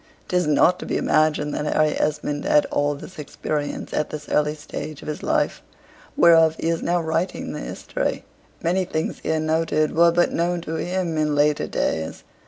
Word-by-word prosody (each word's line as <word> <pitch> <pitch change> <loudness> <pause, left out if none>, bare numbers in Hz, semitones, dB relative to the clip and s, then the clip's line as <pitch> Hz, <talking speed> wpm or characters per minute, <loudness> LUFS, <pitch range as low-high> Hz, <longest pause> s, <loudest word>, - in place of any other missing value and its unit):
'Tis 180 -3 +1
not 165 +4 +4
to - - -6
be - - 0
imagined 155 -1 +2
that 150 - -2
Harry 155 -1 +3
Esmond 150 -1 -1
had 150 - +4
all 145 0 +1
this 175 +4 -11
experience 145 0 -4
at 150 - 0
this 150 -1 -7
early 150 0 +1
stage 150 0 -7
of - - -10
his 150 - -4
life, - - 0 0.6
whereof 165 -2 +6
he 165 - -1
is 165 -1 0
now 175 +1 +1
writing 165 +2 -2
the - - -5
history - - -3 0.4
many 180 +3 +1
things 160 -3 -3
here 160 0 -1
noted 155 -1 0
were 170 +1 +6
but 175 +1 +2
known 175 +1 0
to 165 -1 -6
him 175 -2 -2
in 150 -1 +1
later 145 0 +2
days. 80 0 -2
155 Hz, 185 wpm, -23 LUFS, 150-170 Hz, 0.6 s, whereof